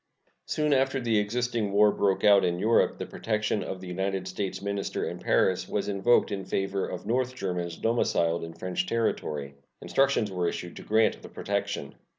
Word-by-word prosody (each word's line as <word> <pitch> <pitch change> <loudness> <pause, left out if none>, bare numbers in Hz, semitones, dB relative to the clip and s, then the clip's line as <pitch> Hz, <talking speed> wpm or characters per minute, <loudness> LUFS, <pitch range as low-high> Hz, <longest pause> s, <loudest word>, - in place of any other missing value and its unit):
Soon 150 -1 +1
after 135 0 +2
the 115 -4 +2
existing 115 0 -1
war 105 +1 +5
broke 100 -2 +1
out 100 -1 +6
in 90 -1 +1
Europe 110 +5 +3
the - - -4
protection 110 -1 -1
of 95 - -5
the 95 - -8
United 95 +1 -2
States 95 -2 -3
minister 100 0 -2
in - - -5
Paris - - +1
was - - -1
invoked 105 +5 +3
in 100 -1 -3
favor 95 0 -1
of - - -6
North 130 +2 0
Germans 90 -5 -3
domiciled 85 -8 +1
in 80 0 -7
French 90 +2 -3
territory. 75 -11 -1 0.3
Instructions 135 -6 +1
were 90 -2 0
issued 85 0 -6
to - - -7
grant 110 +1 +2
the - - -10
protection. - - -3
100 Hz, 175 wpm, -28 LUFS, 90-115 Hz, 0.3 s, out